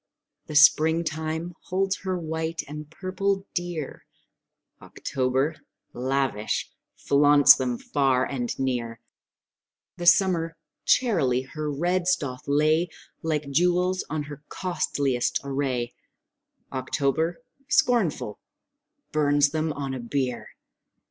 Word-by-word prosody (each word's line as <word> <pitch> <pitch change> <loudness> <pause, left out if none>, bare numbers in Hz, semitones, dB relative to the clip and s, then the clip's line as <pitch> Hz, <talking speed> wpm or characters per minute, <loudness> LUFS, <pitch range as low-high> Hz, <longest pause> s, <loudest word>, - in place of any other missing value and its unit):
The 155 - -6
spring 160 +2 +6
time 160 +2 -3
holds 190 +1 0
her 185 -1 -3
white 160 0 -3
and 150 +1 -8
purple 195 +3 -2
dear; 175 -5 -4 0.7
October, 135 +4 -1 0.4
lavish, 130 -4 -1 0.3
flaunts 145 0 +6
them 125 -2 -2
far 135 -2 +1
and 125 -4 -3
near; 120 -4 -2 1.0
The 175 -1 -3
summer 170 -4 +4 0.3
charily 140 - +2
her 150 +2 -4
reds 175 +4 +1
doth 130 -6 -7
lay 155 +4 +2 0.3
Like 150 -3 -2
jewels 180 +4 +2
on 150 0 -2
her 145 0 -9
costliest 140 -8 -1
array; 135 -3 -2 0.8
October, 150 - -1 0.3
scornful, 190 - +1 0.7
burns 145 -1 +3
them 155 +1 -1
on 140 -2 -4
a 130 - -4
bier. 125 0 -2
150 Hz, 100 wpm, -25 LUFS, 135-170 Hz, 1.0 s, spring